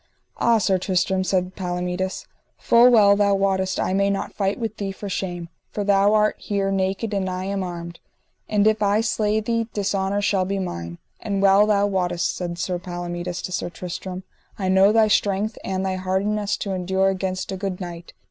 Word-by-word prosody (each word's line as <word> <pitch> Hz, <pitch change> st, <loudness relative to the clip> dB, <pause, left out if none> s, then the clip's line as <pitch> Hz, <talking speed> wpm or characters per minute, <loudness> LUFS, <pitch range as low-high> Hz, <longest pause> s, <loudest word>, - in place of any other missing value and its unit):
Ah, 235 Hz, -1 st, +3 dB
Sir 190 Hz, -3 st, +1 dB
Tristram, 185 Hz, +1 st, 0 dB
said 185 Hz, -1 st, -1 dB
Palomides, 180 Hz, +1 st, -3 dB, 0.3 s
full 240 Hz, +1 st, +5 dB
well 205 Hz, -4 st, +6 dB
thou 200 Hz, -1 st, +3 dB
wottest 190 Hz, -1 st, 0 dB
I -, -, 0 dB
may 200 Hz, +1 st, +2 dB
not 200 Hz, -, -2 dB
fight 195 Hz, -1 st, -1 dB
with 225 Hz, -2 st, -4 dB
thee 195 Hz, -1 st, -3 dB
for 200 Hz, +1 st, -8 dB
shame, 175 Hz, -3 st, -4 dB, 0.2 s
for 205 Hz, -, -3 dB
thou 200 Hz, +1 st, +4 dB
art 215 Hz, 0 st, +2 dB
here 200 Hz, -1 st, -1 dB
naked 195 Hz, +3 st, -1 dB
and 190 Hz, -2 st, -1 dB
I 185 Hz, 0 st, -3 dB
am 195 Hz, +1 st, -2 dB
armed, 170 Hz, -1 st, -7 dB, 0.5 s
and 210 Hz, -1 st, +2 dB
if 215 Hz, 0 st, +3 dB
I 205 Hz, +1 st, +3 dB
slay 215 Hz, -1 st, 0 dB
thee, 230 Hz, +1 st, -1 dB
dishonour 200 Hz, 0 st, -1 dB
shall 195 Hz, -2 st, +2 dB
be 195 Hz, +1 st, -2 dB
mine. 85 Hz, -, -5 dB, 0.2 s
And 200 Hz, -2 st, -2 dB
well 195 Hz, +1 st, +5 dB
thou 205 Hz, -1 st, +3 dB
wottest, 180 Hz, -3 st, -1 dB
said 175 Hz, -1 st, -4 dB
Sir 180 Hz, 0 st, -2 dB
Palomides 175 Hz, 0 st, -5 dB
to -, -, -5 dB
Sir 180 Hz, -, -2 dB
Tristram, 180 Hz, +2 st, -6 dB, 0.3 s
I 190 Hz, -2 st, -1 dB
know 190 Hz, +2 st, +5 dB
thy 220 Hz, 0 st, +4 dB
strength 205 Hz, +1 st, +1 dB
and 190 Hz, 0 st, -2 dB
thy 190 Hz, -1 st, -1 dB
hardiness 200 Hz, +3 st, -1 dB
to 200 Hz, -, -3 dB
endure 190 Hz, +1 st, +1 dB
against 185 Hz, 0 st, -3 dB
a -, -, -2 dB
good 190 Hz, -1 st, -4 dB
knight. 175 Hz, -2 st, -8 dB
195 Hz, 190 wpm, -23 LUFS, 185-205 Hz, 0.5 s, well